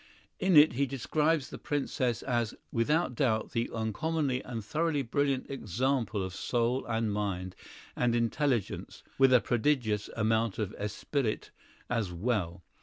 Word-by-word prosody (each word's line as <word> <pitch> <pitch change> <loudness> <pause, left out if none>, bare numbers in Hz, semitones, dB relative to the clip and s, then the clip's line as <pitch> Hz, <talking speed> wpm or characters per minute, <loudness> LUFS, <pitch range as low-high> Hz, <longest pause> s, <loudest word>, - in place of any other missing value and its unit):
In 190 -4 +4
it 150 -2 +8
he 140 +3 +1
describes 150 +3 0
the - - -7
Princess 130 -5 -1
as 120 -3 -1 0.2
"without 150 +5 +1
doubt 115 -4 0
an 115 0 0
uncommonly 130 +5 -1
and 115 -4 -6
thoroughly 155 +2 0
brilliant 135 +2 0
example 125 -2 -1
of 95 -1 -5
soul 120 +5 0
and 115 -2 0
mind 95 -3 -2 0.4
and 120 -1 +2
intelligence 120 -1 -1 0.2
(with 135 -1 +6
a 125 - +7
prodigious 120 -4 +1
amount 110 -1 +1
of 105 -4 -2
esprit 110 +4 -2 0.4
as 115 -6 -1
well). 90 -2 -2
120 Hz, 135 wpm, -30 LUFS, 110-140 Hz, 0.4 s, it